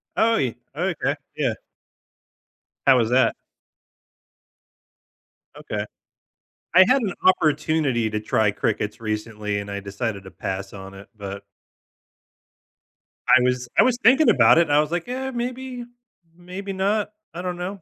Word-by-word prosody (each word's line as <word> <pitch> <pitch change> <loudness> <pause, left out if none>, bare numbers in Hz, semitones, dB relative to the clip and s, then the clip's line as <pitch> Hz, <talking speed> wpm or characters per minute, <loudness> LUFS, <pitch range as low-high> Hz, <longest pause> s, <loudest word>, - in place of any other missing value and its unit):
Oh, 230 0 +3
ye 125 -4 -1 0.2
Okay, 175 +1 -1 0.2
yeah. - - 0 1.3
How 135 -1 +7
was 115 -2 +1
that? 130 +1 +3 2.2
Okay. 105 0 -4 0.9
I 185 +1 +9
had 260 +2 +4
an 190 -5 -2
opportunity 150 -8 +2
to 105 0 -2
try 110 0 +1
crickets 105 +1 -2
recently 105 -1 -3
and 100 0 -8
I 100 0 -4
decided 100 0 -4
to 95 - -10
pass 95 +1 -5
on 95 0 -9
it, 95 +1 -12
but 100 -1 -7 1.9
I 130 - +7
was 125 -1 0
I - - +8
was 250 -1 +2
thinking 275 +4 +6
about 120 +4 +6
it, - - +7
and 155 -4 +1
I 145 - +5
was 150 +1 0
like, 175 +3 -2
"Yeah, 265 +1 -3
maybe. 250 +1 -5 0.5
Maybe 185 +3 -7
not. 205 +3 0 0.2
I 175 - -5
don't 180 -1 -4
know." 185 +1 -5
145 Hz, 140 wpm, -23 LUFS, -, 2.2 s, I